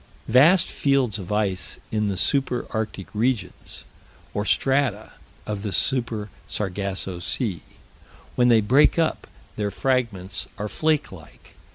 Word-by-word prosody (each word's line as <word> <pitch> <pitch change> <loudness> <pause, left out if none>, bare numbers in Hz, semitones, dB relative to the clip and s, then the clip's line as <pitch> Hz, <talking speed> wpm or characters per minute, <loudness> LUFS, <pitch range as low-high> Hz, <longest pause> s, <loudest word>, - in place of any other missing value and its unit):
Vast 155 +10 +6
fields 135 -7 +1
of 95 0 -7
ice 100 -3 0
in 105 -1 0
the 100 -2 -1
Super 130 +3 +1
Arctic 110 -4 -4
regions, 115 +1 -2 0.5
or 105 - -2
strata, 130 -4 +1 0.3
of 105 -2 -4
the 105 -1 -3
Super 115 -4 0 0.2
Sargasso 95 -2 -3
Sea. 95 - -2 0.7
When 125 - +4
they 115 -2 +5
break 130 +11 +4
up, 165 -1 0 0.3
their 105 -1 -1
fragments 105 -5 -1
are 105 +1 -3
flake 155 +6 0
like. 80 -5 -15
110 Hz, 130 wpm, -24 LUFS, 100-130 Hz, 0.7 s, Vast